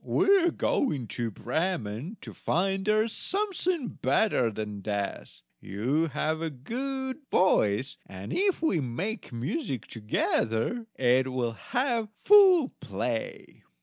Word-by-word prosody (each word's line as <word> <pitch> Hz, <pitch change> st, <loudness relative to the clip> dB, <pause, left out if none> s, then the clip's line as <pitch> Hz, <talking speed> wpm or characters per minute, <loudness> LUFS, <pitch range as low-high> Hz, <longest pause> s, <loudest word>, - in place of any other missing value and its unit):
We 390 Hz, -1 st, +4 dB
are -, -, +4 dB
going 150 Hz, -, 0 dB
to 120 Hz, -2 st, -2 dB
Bremen, 135 Hz, -, -3 dB
to -, -, -9 dB
find 190 Hz, +2 st, 0 dB
there 215 Hz, +1 st, +3 dB
something 370 Hz, -, -1 dB
better 160 Hz, -, +2 dB
than 105 Hz, -1 st, -5 dB
death; 100 Hz, -, -4 dB, 0.2 s
you 125 Hz, -, 0 dB
have 155 Hz, +1 st, -1 dB
a 165 Hz, -, -1 dB
good 260 Hz, -, -4 dB
voice, 130 Hz, -, +2 dB
and 95 Hz, 0 st, -7 dB
if 385 Hz, -3 st, +1 dB
we 250 Hz, -, +2 dB
make 165 Hz, -, -4 dB
music 125 Hz, -, -3 dB
together 115 Hz, -, -1 dB
it 130 Hz, +1 st, +2 dB
will 125 Hz, -2 st, -1 dB
have 240 Hz, -, -1 dB, 0.2 s
full 380 Hz, -8 st, +7 dB
play." 110 Hz, +4 st, -4 dB
160 Hz, 120 wpm, -28 LUFS, -, 0.2 s, full